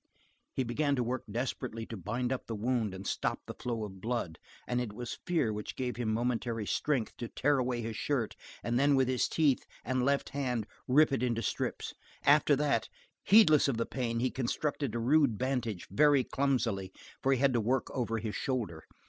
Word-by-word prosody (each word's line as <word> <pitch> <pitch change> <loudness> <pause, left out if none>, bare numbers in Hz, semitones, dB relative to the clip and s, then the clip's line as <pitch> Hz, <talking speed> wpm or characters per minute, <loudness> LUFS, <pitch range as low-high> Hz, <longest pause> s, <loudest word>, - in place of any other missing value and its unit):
He 130 - +1
began 140 +4 0
to 125 - 0
work 125 +2 -3
desperately 115 0 -3
to 115 - -7
bind 120 +7 -2
up 130 - -5
the 115 - -3
wound 110 -2 0
and 95 +1 -8
stop - - -1
the - - -6
flow 115 -3 -3
of 95 -3 -8
blood 115 -8 -2 0.3
and 125 0 0
it 115 -4 -4
was 120 +2 -6
fear 160 - +1
which 105 0 -5
gave 125 -1 -2
him 115 -3 -1
momentary 115 -1 -1
strength 135 0 0
to 120 - -4
tear 145 +4 +1
away 125 -1 -1
his 110 0 -4
shirt 125 -2 -1 0.3
and 120 +1 +1
then 140 +1 +4
with 130 -1 +3
his 130 -1 +1
teeth 150 -5 +2 0.2
and 130 0 0
left 140 +2 +1
hand 125 -5 -1 0.2
rip 150 +4 +5
it 135 - 0
into 115 -2 0
strips. - - -2 0.3
After 145 0 +6
that, 140 -5 +1 0.4
heedless 185 -9 +7
of 135 -5 0
the 115 - 0
pain, 115 -3 -2
he 130 - +1
constructed 135 0 -2
a - - 0
rude 135 -1 +3
bandage, 125 -7 -2
very 145 +5 +5
clumsily, 120 -10 0 0.3
for 135 - +2
he 135 - +4
had 135 +1 +3
to 120 - +2
work 125 +4 0
over 115 -3 -1
his 110 -1 -4
shoulder. 105 -12 -2
125 Hz, 200 wpm, -31 LUFS, 115-135 Hz, 0.4 s, heedless